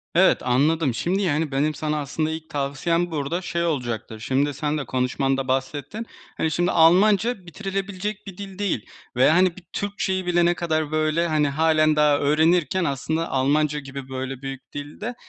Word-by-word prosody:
Evet 185 +2 +5
anladım. 140 +3 +2
Şimdi, 180 - 0
yani, 155 -4 0
benim 145 +3 +1
sana 150 +1 -2
aslında 150 +2 -2
ilk 160 0 -6
tavsiyem 165 +5 -1
burada 160 +3 -2
şey 170 -2 -2
olacaktır. 120 -7 -3
Şimdi, 135 +5 0
sen 150 +2 -2
de 145 - -3
konuşmanda 135 +1 0
bahsettin. 140 - -2 0.3
Hani, 160 - 0
şimdi, 175 +3 +1
Almanca 195 +5 +4
bitirilebilecek 195 +2 -4
bir 190 -2 -9
dil 195 -1 -8
değil 195 - -1 0.3
ve, 125 - +5
hani, 180 +2 +4
bir 185 - -12
Türkçe'yi 195 -2 -2
bile 175 -1 +3
ne 175 - +4
kadar 160 -3 -1
böyle, 155 +2 +1
hani, 155 -3 +2
hâlen 155 +1 +3
daha 150 -1 +4
öğrenirken 165 +5 +2
aslında 160 +4 -2
Almanca 150 +3 +1
gibi, 135 -1 -8
böyle, 130 0 -5
büyük 135 -1 -7
dilde 150 +12 -6
155 Hz, 165 wpm, -23 LUFS, 140-175 Hz, 0.3 s, Evet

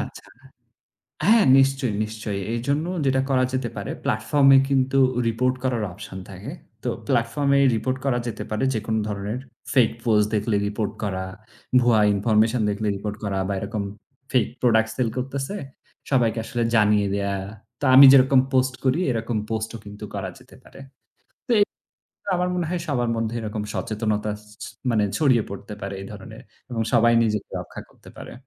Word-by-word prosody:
আচ্ছা। - - -8 1.0
হ্যাঁ, 225 0 +6
নিশ্চয়ই, 135 -3 +2
নিশ্চয়ই। 110 -2 -5
এইজন্য 140 +7 -1 0.2
যেটা 130 0 +2
করা 130 -1 +3
যেতে 130 - -1
পারে - - -4
platform-এ 135 -2 +4
কিন্তু 135 0 +2 0.3
report 125 +3 +1
করার 120 -4 0
option 95 0 -9
থাকে। 95 0 -8 0.3
তো - - -1 0.2
platform-এ 140 +5 +2 0.2
report 130 +4 -1
করা 130 -3 +2
যেতে 115 - -4
পারে। 110 +4 -1
যেকোনো 110 0 -1
ধরনের 105 +2 -3 0.4
fake 125 -5 +4
post 105 -3 +4
দেখলে 105 +1 0
report 105 0 -2
করা, 95 -2 -2 0.6
ভুয়া 120 -3 +4
information 110 +3 +2
দেখলে 105 +1 -2
report 105 +1 -5
করা 100 -2 -1
বা - - 0
এরকম 100 0 -3 0.5
fake 125 -4 +2
product 110 -2 +3
sell 120 -3 +1
করতেছে 135 +7 -3 0.6
সবাইকে 120 -3 +2
আসলে 120 -2 -2
জানিয়ে 105 -2 +3
দেয়া। 100 0 -1 0.5
তো 145 - 0
আমি 140 - +11
যেরকম 135 0 +6
post 130 0 +2
করি 130 +6 +2
এরকম 115 -1 -2
post 110 0 -2
ও - - -5
কিন্তু 105 +1 -10
করা 95 -2 -3
যেতে - - -18
পারে। - - -15 0.7
তো - - -8
এ - - +7 0.8
আমার 180 0 0
মনে 175 -1 -1
হয় 175 -1 -2
সবার 120 -5 0
মধ্যে 115 +1 -2
এরকম 105 -1 -4
সচেতনতা 110 -1 -2 0.3
ছ - - -4 0.3
মানে 110 -2 +2
ছড়িয়ে 130 -7 +3
পড়তে 100 +1 -8
পারে 100 +1 -4
এই 95 - -8
ধরনের - - -10 0.3
এবং 115 - -1
সবাই 120 0 +5
নিজেকে 105 -2 -1
রক্ষা - - -9
করতে - - -17
পারে। - - -9
115 Hz, 160 wpm, -23 LUFS, 105-130 Hz, 1.0 s, আমি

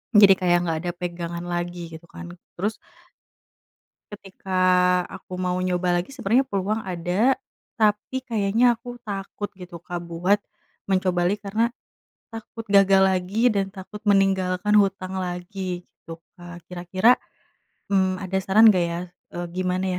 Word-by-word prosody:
jadi 200 -2 +9
kayak 175 -1 +3
nggak 165 -1 0
ada - - 0
pegangan 170 -1 -5
lagi 175 -1 -4
gitu 160 - -12
kan 175 -1 -9 0.3
terus 210 +4 -1 1.4
Ketika 190 -2 -4 0.4
aku 185 0 -9
mau 180 0 -1
nyoba 180 -1 +1
lagi 180 - -8
sebenernya 240 +2 +2
peluang 200 +2 -1
ada 185 +6 +1 0.4
tapi 220 +4 0
kayaknya 230 +1 +2
aku 245 +1 -9
takut 205 0 -5
gitu 180 -2 -10
Kak 175 +1 -6
buat 180 +5 +2 0.5
mencoba 185 -2 +1
lagi 205 +3 -1
karena, 215 +3 0 0.6
takut 225 0 -8
gagal 195 -1 +6
lagi 190 +5 +2
dan 195 -2 -1
takut 195 +1 -9
meninggalkan 195 0 +3
hutang 190 -2 +1
lagi 180 0 -4
gitu 165 0 -12 0.2
kan 175 0 -10
kira-kira, 185 +7 +3 0.7
mmm, 190 -1 +1
ada 190 0 -1
saran 210 +4 +6
gak 180 -4 +2
ya, 170 0 -3 0.4
eee, 175 0 -3
gimana 185 +1 -1
190 Hz, 135 wpm, -24 LUFS, 180-205 Hz, 1.4 s, jadi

